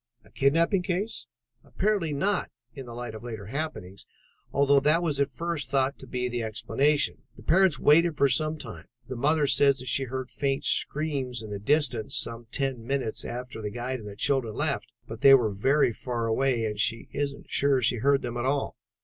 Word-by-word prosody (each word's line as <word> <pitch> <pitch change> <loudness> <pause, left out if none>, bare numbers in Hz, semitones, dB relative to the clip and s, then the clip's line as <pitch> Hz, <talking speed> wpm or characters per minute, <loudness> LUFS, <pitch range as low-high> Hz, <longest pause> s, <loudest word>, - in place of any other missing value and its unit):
"A - - -21
kidnapping 165 +7 +2
case?" 185 +5 -3 0.4
"Apparently 195 -5 -1
not, 190 +7 0 0.2
in 135 0 -9
the 120 - -8
light 120 -2 -6
of 110 +1 -9
later 110 -4 -7
happenings, 105 - -5 0.4
although 140 0 +4
that 155 +5 +2
was 150 -4 -1
at 140 - +1
first 155 0 -4
thought 135 0 0
to 130 - -11
be 125 0 -2
the 120 -1 -3
explanation. 135 +6 0
The - - -14
parents 185 -2 +4
waited 165 +2 +4
for 140 - +4
some 155 +4 +1
time. 110 - -8 0.2
The 130 - -5
mother 150 +4 +2
says 140 0 +4
that 130 0 -8
she 135 +2 +3
heard 130 0 -5
faint 135 -1 -1
screams 135 -6 -1
in 105 - -8
the 100 - -4
distance 130 -2 0
some 115 0 -2
ten 135 -2 -2
minutes 130 -2 -2
after 125 -1 -6
the 105 - -3
guide 125 +4 -4
and 105 - -9
the 100 - -8
children 120 -1 0
left, - - -1 0.2
but - - -8
they 135 0 +9
were 115 -5 +2
very 135 +7 +2
far 120 0 -3
away 115 0 +1
and 105 -1 -4
she 115 +2 +1
isn't 140 -1 -4
sure 140 0 +2
that 130 - 0
she 120 - +2
heard 140 +4 +2
them 120 -1 -4
at 120 - -2
all. 140 +1 -1
135 Hz, 200 wpm, -27 LUFS, 120-145 Hz, 0.4 s, they